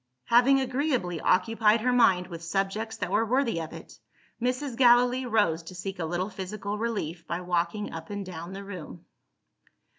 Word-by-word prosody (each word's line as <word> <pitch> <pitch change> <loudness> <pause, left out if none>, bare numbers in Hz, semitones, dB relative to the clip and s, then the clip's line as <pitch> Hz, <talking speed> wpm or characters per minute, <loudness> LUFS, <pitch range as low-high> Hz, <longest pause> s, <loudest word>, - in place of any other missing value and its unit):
Having 250 +3 +5
agreeably 255 - -1
occupied 220 +3 +3
her 250 +2 +2
mind 190 -7 +4
with 170 -1 -8
subjects 195 +5 -2
that - - -3
were - - +3
worthy 230 -6 +1
of 160 - -7
it, - - -11 0.4
Mrs. 250 +1 -1
Gallilee 245 +1 +4
rose 205 -8 +2
to 170 +3 -11
seek 190 +1 -6
a 165 - -1
little 175 +5 -2
physical 200 +2 -5
relief 180 -8 -3
by 170 - -2
walking 175 +3 -1
up 165 0 -7
and 205 -1 -4
down 175 0 -7
the 195 +1 -7
room. 180 -3 -9
200 Hz, 170 wpm, -27 LUFS, 175-235 Hz, 0.4 s, Having